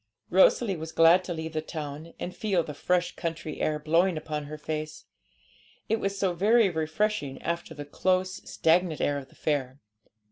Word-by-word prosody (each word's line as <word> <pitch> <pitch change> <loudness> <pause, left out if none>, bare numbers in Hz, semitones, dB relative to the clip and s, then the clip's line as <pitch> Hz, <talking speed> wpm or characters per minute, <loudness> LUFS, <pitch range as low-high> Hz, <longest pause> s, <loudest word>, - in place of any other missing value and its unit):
Rosalie 190 +2 +4
was 160 0 -6
glad 165 +3 +6
to 175 - -3
leave 160 0 -5
the 155 - -1
town, 155 +1 -7
and 180 - -5
feel 195 -6 +1
the 150 - -7
fresh 180 +4 0
country 160 -3 -4
air 155 - +1
blowing 165 +4 +2
upon 150 -1 -4
her 155 +1 -7
face. 155 0 -5 0.8
It 225 - +2
was 195 0 -2
so 190 -2 +1
very 210 +3 +4
refreshing 160 -2 -1
after 170 -1 -3
the 145 0 -7
close, 185 +5 0
stagnant 165 0 +2
air 145 0 +1
of 135 -1 -12
the - - -21
fair. 140 -3 -2
160 Hz, 175 wpm, -27 LUFS, 155-185 Hz, 0.8 s, glad